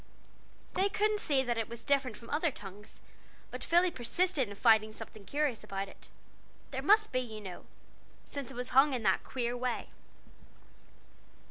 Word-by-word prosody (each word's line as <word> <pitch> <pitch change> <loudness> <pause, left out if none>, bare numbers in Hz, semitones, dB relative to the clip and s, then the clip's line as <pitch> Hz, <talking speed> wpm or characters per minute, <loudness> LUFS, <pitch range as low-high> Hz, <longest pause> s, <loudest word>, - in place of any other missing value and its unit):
They 385 +2 +2
couldn't 425 0 +1
see 275 -8 +2
that 240 -2 -1
it 225 - -2
was 235 0 -7
different 270 -5 +1
from 230 - -12
other 315 +3 +2
tongues, 205 -4 -11 0.5
but - - -5
Philly 350 +1 +4
persisted 270 - +1
in 200 - -7
finding 215 -1 +4
something 215 -1 -10
curious 285 0 -1
about 195 -2 -4
it; - - -14 0.6
there 265 -1 -3
must 425 +8 +5
be, 255 - +1
you 225 -4 -5
know 190 -4 -8 0.6
since 280 -4 -6
it - - -8
was 250 +1 -4
hung 270 +1 +5
in 240 - -3
that 190 -2 +3
queer 245 -2 -2
way! 245 -1 -2
250 Hz, 165 wpm, -32 LUFS, 220-295 Hz, 0.6 s, must